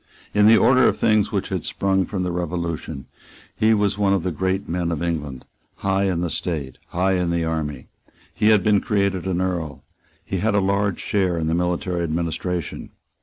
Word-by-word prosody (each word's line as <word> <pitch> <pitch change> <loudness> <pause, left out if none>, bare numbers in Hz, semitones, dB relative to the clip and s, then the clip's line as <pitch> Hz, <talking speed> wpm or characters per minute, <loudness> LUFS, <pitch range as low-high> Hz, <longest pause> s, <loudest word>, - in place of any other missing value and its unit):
In 105 0 +5
the 115 0 +7
order 130 +3 +5
of - - +1
things 110 -1 +2
which 100 -3 -2
had 95 -5 -2
sprung 95 -1 0
from 95 -3 -2
the 90 - -1
Revolution, 85 -4 -4 0.5
he 110 +1 +3
was 105 -1 0
one 100 -1 +3
of 95 -4 0
the 90 - -1
great 95 +4 -1
men 85 0 -1
of 85 0 -2
England, 75 -6 -3 0.3
high 95 0 0
in 90 -3 0
the 90 - -1
state, 75 -7 -4
high 95 +2 +1
in 90 -2 0
the 85 -1 0
army. 75 -4 -3 0.5
He 105 - +1
had 110 -3 +5
been 105 -2 +3
created 100 -3 0
an 90 -2 0
Earl. 85 -5 -3 0.4
He 95 - -2
had 105 +2 +1
a - - +4
large 100 0 0
share 95 -4 0
in 80 - -1
the 80 - 0
military 90 0 -1
administration. 85 +2 -3
90 Hz, 195 wpm, -22 LUFS, 85-100 Hz, 0.5 s, the